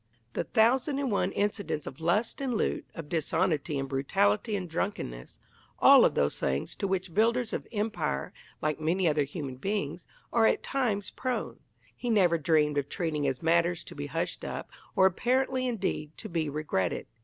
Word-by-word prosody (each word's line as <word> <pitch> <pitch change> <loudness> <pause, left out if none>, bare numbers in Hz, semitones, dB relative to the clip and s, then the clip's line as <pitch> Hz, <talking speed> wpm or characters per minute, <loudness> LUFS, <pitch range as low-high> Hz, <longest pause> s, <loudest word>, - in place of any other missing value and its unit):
The - - -1
thousand 255 +6 +3
and 275 -4 -1
one 200 - +1
incidents 205 -7 -1
of 135 - -8
lust 205 +11 +1
and 260 -3 -1
loot, - - -1
of 165 -3 -7
dishonesty 160 -1 0
and 135 0 -2
brutality 135 - +1
and 185 -3 -3
drunkenness 155 - -4 0.4
all - - +8
of - - +2
those 70 - +1
things 70 +1 -1
to 200 - -1
which 185 -2 -2
builders 235 +3 +2
of - - -3
Empire, 210 - -2 0.3
like 155 0 0
many 170 +4 +1
other 150 -2 +2
human 140 -3 -6
beings, 180 -1 -3 0.3
are 225 -2 +5
at - - +1
times 215 -7 -1
prone 255 -1 -3 0.4
he 245 - -4
never 180 -7 +4
dreamed 150 -2 +3
of 140 0 -4
treating 160 -5 -1
as 130 - -2
matters 170 +1 +2
to - - -10
be 145 0 -5
hushed 165 +4 -3
up, - - -5 0.2
or, 190 -2 +5
apparently, 255 +6 +1
indeed, 190 -9 -2
to - - -7
be 160 -3 -1
regretted. 145 - -1
175 Hz, 175 wpm, -29 LUFS, 150-215 Hz, 0.4 s, all